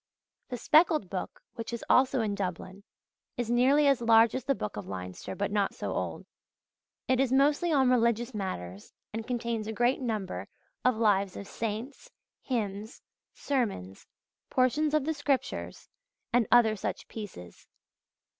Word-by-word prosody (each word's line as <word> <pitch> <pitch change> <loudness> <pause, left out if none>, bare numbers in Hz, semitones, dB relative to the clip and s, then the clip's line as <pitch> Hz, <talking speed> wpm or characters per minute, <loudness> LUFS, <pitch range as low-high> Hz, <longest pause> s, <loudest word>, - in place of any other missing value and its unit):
The 250 - -4
Speckled 310 - +3
Book, 185 - -5
which 230 0 -6
is 235 - -5
also 260 -1 +4
in 210 -2 -1
Dublin, 190 0 -5 0.5
is 240 -1 -2
nearly 265 +5 +4
as 275 -3 +3
large 230 -1 +5
as 260 - -3
the 275 0 +2
Book 105 - -5
of 105 - -6
Leinster, 90 -1 -6
but 200 0 -2
not 205 -1 0
so - - -4
old. - - -4 0.8
It 260 -1 +2
is 265 -2 +2
mostly 290 +5 +3
on 265 -4 +4
religious 235 0 +2
matters, 100 - -5 0.2
and 225 0 -5
contains 235 -3 -2
a - - -2
great 240 +5 +1
number 200 - -3 0.4
of 250 -2 +3
Lives 200 -4 +2
of 200 - -7
saints, 230 - -5 0.3
hymns, 215 -3 -3 0.4
sermons, 205 - -2 0.4
portions 290 +4 +2
of 300 -3 +1
the 320 - 0
Scriptures, 285 -2 -2 0.5
and 245 -2 +3
other 230 -3 +6
such 200 - -4
pieces. 185 - -9
230 Hz, 150 wpm, -29 LUFS, 200-260 Hz, 0.8 s, other